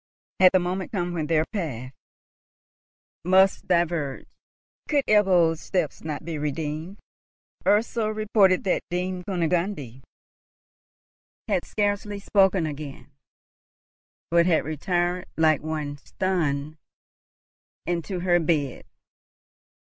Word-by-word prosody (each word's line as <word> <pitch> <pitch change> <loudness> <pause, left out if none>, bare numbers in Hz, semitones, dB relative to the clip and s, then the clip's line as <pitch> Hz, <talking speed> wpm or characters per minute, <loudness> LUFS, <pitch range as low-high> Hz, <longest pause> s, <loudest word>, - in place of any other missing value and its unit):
had 185 -1 +8
the 185 - +4
moment 185 +3 -2
come 175 -5 -2
when 160 -3 -2
their 160 -1 +2
paths 135 - -4 1.3
must 190 +2 +3
diverge? 170 -6 0 0.6
Could 285 -3 +2
Ebbo's 180 -6 +4
step 180 -6 -1
not 155 0 -5
be 165 -3 -4
redeemed? 155 +5 -4 0.7
Ursel 215 +1 +2
reported 210 -3 +3
that 190 - +1
Dame 180 +1 -2
Kunigunde 170 - -2 1.5
had - - 0
scarcely 205 0 -1
spoken 195 -3 +2
again, 145 -2 -7 1.2
but 170 0 +4
had 165 -3 +2
retired, 175 +4 -1
like 155 -2 +3
one 150 -2 -4
stunned, 155 -3 -2 1.1
into 175 +1 -2
her 175 -1 +3
bed. 150 -5 -1
175 Hz, 100 wpm, -25 LUFS, 155-190 Hz, 1.5 s, had